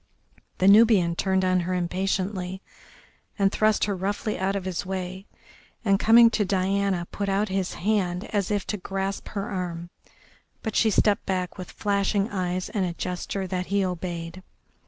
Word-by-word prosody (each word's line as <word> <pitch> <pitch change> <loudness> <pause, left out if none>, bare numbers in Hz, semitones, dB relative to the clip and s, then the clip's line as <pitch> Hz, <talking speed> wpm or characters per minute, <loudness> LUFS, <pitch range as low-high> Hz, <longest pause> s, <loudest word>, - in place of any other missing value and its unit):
The 185 - +2
Nubian 200 -5 +6
turned 190 +1 +1
on 185 0 +3
her 180 +1 -1
impatiently 185 +1 -2 0.7
and 195 -2 +3
thrust 215 0 +2
her 205 - -1
roughly 200 +3 -2
out 190 +1 0
of 195 -2 -3
his 185 -2 -2
way, 185 +1 -5 0.6
and, 195 -1 +3
coming 230 +1 +7
to 220 - +1
Diana, 195 -1 0
put 200 -1 -3
out 200 +2 +1
his 190 -1 -2
hand 185 -3 0
as 200 -3 0
if 205 -2 -1
to 210 - -3
grasp 195 +1 -4
her 200 -1 -4
arm, 175 -2 -4 0.7
but 220 - -3
she 225 - +4
stepped 205 0 +2
back 185 -2 -2
with 185 - -7
flashing 200 +1 0
eyes 185 -2 -2
and 200 - -1
a 175 -2 -2
gesture 180 +2 -4
that 185 -1 -3
he 200 +1 +1
obeyed. 175 0 -5
190 Hz, 165 wpm, -25 LUFS, 180-200 Hz, 0.7 s, coming